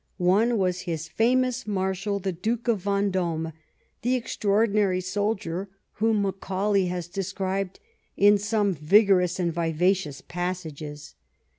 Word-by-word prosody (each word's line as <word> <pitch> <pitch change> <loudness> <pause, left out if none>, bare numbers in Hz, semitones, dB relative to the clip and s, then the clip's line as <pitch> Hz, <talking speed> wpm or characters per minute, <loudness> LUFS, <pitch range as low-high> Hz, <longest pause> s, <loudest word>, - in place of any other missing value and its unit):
One 205 +6 +3
was 180 -2 0
his 165 -1 -3
famous 250 +6 +1
marshal, 195 0 -1
the 195 -1 -2
Duke 225 +7 -3
of 210 -5 0
Yendome, 185 -5 0 0.5
the 245 +3 +1
extraordinary 210 -4 +1
soldier 190 -1 -2 0.2
whom 220 -1 +1
Macaulay 195 0 0
has 175 -1 -3
de 195 +3 -3
scribed 190 0 -3 0.4
in 205 +1 +6
some 205 -1 +1
vigorous 180 +3 +4
and 170 -2 0
vivacious 170 -1 0
passages. 160 -5 -5
190 Hz, 120 wpm, -26 LUFS, 175-205 Hz, 0.5 s, in